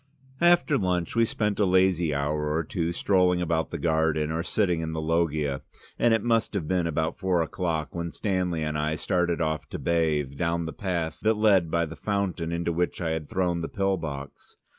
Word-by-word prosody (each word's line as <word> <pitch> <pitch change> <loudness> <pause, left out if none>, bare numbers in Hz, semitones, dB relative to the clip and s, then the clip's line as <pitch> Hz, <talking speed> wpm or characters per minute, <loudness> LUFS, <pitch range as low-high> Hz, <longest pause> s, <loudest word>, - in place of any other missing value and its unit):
After 175 -4 +4
lunch 90 -2 -1
we 115 0 +4
spent 105 -2 -1
a 105 - +4
lazy 90 -3 +3
hour 75 +1 -1
or 80 - +1
two 85 0 -2
strolling 90 0 +2
about 80 -4 0
the - - -4
garden 80 -2 +1
or 80 +1 -1
sitting 90 -2 0
in 80 0 -3
the 80 - -2
loggia, 80 -3 0 0.4
and 120 - +4
it 115 -2 +2
must 115 -2 +1
have 85 -6 -2
been 90 -1 +1
about 80 0 -1
four 90 -3 +2
o'clock 80 -1 -3
when 85 0 -3
Stanley 90 -5 -1
and 75 0 -2
I 75 +1 0
started 85 +2 0
off 80 -1 -2
to - - -5
bathe, 75 -5 0
down 85 0 0
the 80 - -5
path 85 -4 -3
that 110 0 +2
led 100 -6 +4
by 85 +1 +1
the 80 0 -8
fountain 100 -5 -2
into 85 0 -1
which 90 +2 -1
I 80 -2 -1
had 80 -2 -3
thrown 90 -2 0
the 80 - -4
pill 95 -1 0
box. 70 -5 -8
85 Hz, 205 wpm, -26 LUFS, 80-95 Hz, 0.4 s, After